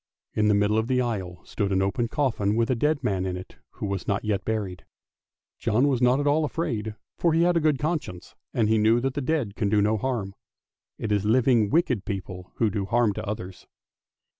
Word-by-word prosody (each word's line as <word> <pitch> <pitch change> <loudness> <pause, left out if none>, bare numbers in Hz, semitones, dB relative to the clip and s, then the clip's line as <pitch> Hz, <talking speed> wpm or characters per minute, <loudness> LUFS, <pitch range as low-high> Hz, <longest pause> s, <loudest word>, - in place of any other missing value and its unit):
In 105 0 +2
the 105 - +4
middle 105 +2 +2
of 110 - -2
the 130 0 +1
aisle 95 -8 -3
stood 100 -2 -2
an 95 0 +2
open 115 +5 0
coffin 115 -7 0
with 115 +2 +1
a - - +2
dead 145 +3 0
man 95 -6 0
in 90 -1 -2
it 90 - -11 0.2
who - - -5
was 100 -2 -3
not 100 +1 -1
yet 105 -2 0
buried. 100 -5 -3 0.8
John 125 +7 +2
was 130 -4 +1
not 125 +2 +4
at 145 - -1
all 150 +2 +3
afraid, 110 -9 -2 0.2
for 170 -2 +3
he 165 +1 +3
had 175 0 +3
a - - +4
good 155 -2 +2
conscience, 150 - -3 0.2
and 110 -3 +1
he 110 0 +3
knew 110 +2 +4
that 135 +2 -1
the 145 - -2
dead 130 -7 -1
can 105 - 0
do 105 0 +3
no 105 +2 +2
harm; 105 -5 -2 0.6
it 110 - -4
is 100 -2 +2
living 115 -1 +3
wicked 125 - +1
people 95 -2 -6
who 110 -3 +1
do 100 0 -2
harm 115 -1 +2
to 110 +1 -6
others. 95 -3 -6
110 Hz, 220 wpm, -25 LUFS, 100-130 Hz, 0.8 s, the